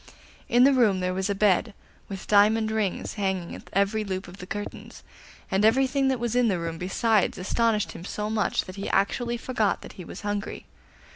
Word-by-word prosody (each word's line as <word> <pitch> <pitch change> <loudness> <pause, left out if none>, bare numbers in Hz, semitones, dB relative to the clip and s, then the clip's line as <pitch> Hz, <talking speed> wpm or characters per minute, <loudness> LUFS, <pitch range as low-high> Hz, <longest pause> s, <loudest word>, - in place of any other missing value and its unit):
In 245 +1 +5
the 275 +1 +6
room 220 -7 +3
there 185 0 -1
was 190 +2 -2
a 200 - 0
bed, 205 +1 +2 0.3
with 195 -2 -6
diamond 215 +2 +4
rings 215 -4 -1
hanging 190 -3 -1
at - - -11
every 200 +3 +1
loop 190 -2 -4
of 180 +2 -11
the 180 - -9
curtains, 205 +1 -7 0.5
and 195 +2 +2
everything 265 +4 +3
that 260 -2 +1
was 240 0 -2
in 245 -1 +4
the 195 -4 +1
room 165 -1 -4
besides 205 +3 +1
astonished 210 -1 0
him 170 - -9
so 210 +3 -4
much 215 -1 0
that 185 +1 -10
he 195 - -4
actually 235 +5 0
forgot 230 -4 -1
that - - -10
he 185 - -9
was - - -9
hungry. 205 -1 -4
205 Hz, 200 wpm, -26 LUFS, 190-225 Hz, 0.5 s, the